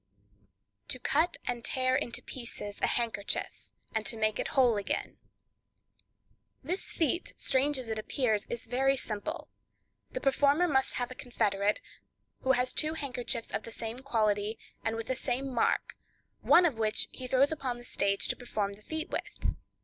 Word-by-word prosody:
To - - -2
Cut 310 +7 +2
and 240 -1 -2
Tear 255 +1 +2
into 245 -3 -1
Pieces 220 -5 -6
a - - +4
Handkerchief, 230 -4 -1 0.2
and 220 - 0
to 225 - +1
Make 215 -1 +1
it - - 0
Whole 245 -4 +6 1.9
Again.—This 360 +6 0
feat, 340 +2 0
strange 275 +2 +3
as 255 -2 -5
it 220 -1 -2
appears, 220 -2 0
is 235 - -4
very 270 +3 +2
simple; 295 +8 -4 0.6
the - - -3
performer 285 +5 +4
must 265 -4 +2
have 245 0 -1
a - - -3
confederate, 210 -5 0 0.6
who 265 - +4
has 250 0 +1
two 310 +1 +1
handkerchiefs 250 -5 -3
of - - -1
the 230 - -8
same 225 +2 -5
quality, 215 -4 +1 0.3
and 225 0 0
with 225 0 -3
the 260 - -1
same 260 +1 -2
mark, 235 - +1 0.5
one 355 - +7
of 270 -10 +1
which 215 0 +2
he 255 - -6
throws 265 +3 +4
upon 265 -6 -2
the 240 - -9
stage 200 -4 +1
to - - +1
perform 210 -5 -2
the 200 - -11
feat 315 - -4
with. - - -2
245 Hz, 165 wpm, -31 LUFS, 220-270 Hz, 1.9 s, one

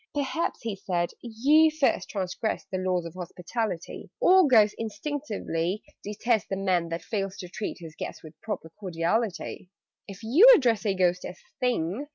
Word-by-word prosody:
"Perhaps," 290 +2 -2
he 225 -3 -3
said, 175 -3 -2
"you 280 +8 +4
first 310 -3 0
transgressed 195 +2 -3
The 185 - -1
laws 185 -2 0
of 165 - -7
hospitality: 180 +2 -5
All 375 -7 +6
Ghosts 215 -5 +5
instinctively 215 - -3 0.2
detest 215 +2 0
The 195 - -1
Man 185 -3 0
that 165 +1 -4
fails 195 -3 -3
to 180 - -7
treat 195 +4 -5
his 165 -2 -10
guest - - -7
With 155 0 -14
proper 210 -7 -5
cordiality. 185 +1 -2 0.4
"If 195 +2 -10
you 325 - +8
address 230 - +1
a 195 - +1
Ghost 180 -1 +1
as 180 - -7 0.2
'Thing!' 250 - -1
205 Hz, 160 wpm, -27 LUFS, 180-240 Hz, 0.4 s, you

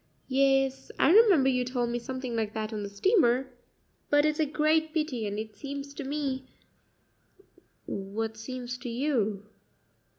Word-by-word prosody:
"Yes; 270 0 +2
I 310 - +4
remember 385 - +6
you 250 -1 +2
told 245 -1 -1
me 240 - -1
something 255 0 -5
like 220 -2 -2
that 220 0 -3
on 210 - -3
the 200 - -5
steamer; 260 - +2 0.6
but 290 0 +4
it's 305 0 0
a 310 - +2
great 310 +2 +1
pity, 270 -9 -1
and 205 0 -4
it 215 -1 -6
seems 280 +4 -6
to 285 - -6
me 270 -2 -3 0.7
" 390 - -32
"What 215 +3 -4
seems 250 +2 -6
to 245 0 -6
you?" 230 -6 0
260 Hz, 160 wpm, -28 LUFS, 225-290 Hz, 0.7 s, remember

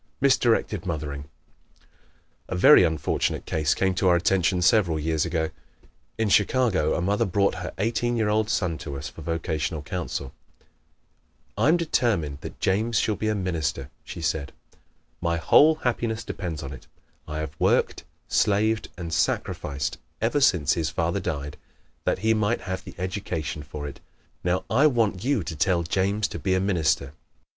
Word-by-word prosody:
Misdirected 120 -7 +2
Mothering 75 -4 -4 0.5
¶ - - -31 0.6
A - - -3
very 90 - +8
unfortunate 80 -3 0
case 75 -2 +1
came 95 0 +1
to 95 +1 +1
our 90 - +5
attention 90 +1 +2
several 90 -5 +3
years 80 +1 0
ago. 80 -1 -1 0.7
In 110 -1 +1
Chicago 100 -5 +2
a - - -1
mother 100 +5 +1
brought 100 -1 +1
her 90 - -4
eighteen 115 +3 0
year 110 -2 +1
old 105 +1 +1
son 90 -7 0
to 70 -3 -6
us 70 - -6
for - - -12
vocational 80 -1 -2
counsel. 80 -5 -4 1.2
"I - - +2
am 165 +3 +5
determined 110 - 0
that - - -9
James 110 +4 +1
shall 105 - +1
be 110 - -3
a 110 - +1
minister," 80 -7 -2
she 85 - -8
said. 75 -2 -2 0.7
"My 85 -1 0
whole 155 - +6
happiness 115 -5 -2
depends 85 -9 -5
upon 70 0 -6
it. - - -20 0.4
I 75 0 -5
have 80 -2 -4
worked, - - +2 0.2
slaved 110 +1 +1
and 85 -2 -5
sacrificed 70 -3 -1 0.2
ever 120 +6 +1
since 85 - +4
his 80 -3 -1
father 85 +2 -1
died 75 -5 -4 0.5
that - - +1
he 110 - +5
might 110 +2 0
have 95 0 -4
the 90 - -10
education 90 -5 -3
for 75 0 -7
it. 70 - -9 0.4
Now 90 +1 0
I 140 +7 +4
want 115 -9 +1
you 130 -6 +1
to 80 - -5
tell 85 +2 +1
James 100 +4 0
to - - -6
be 95 -1 +1
a - - +2
minister." 80 -7 0
90 Hz, 165 wpm, -25 LUFS, 80-110 Hz, 1.2 s, very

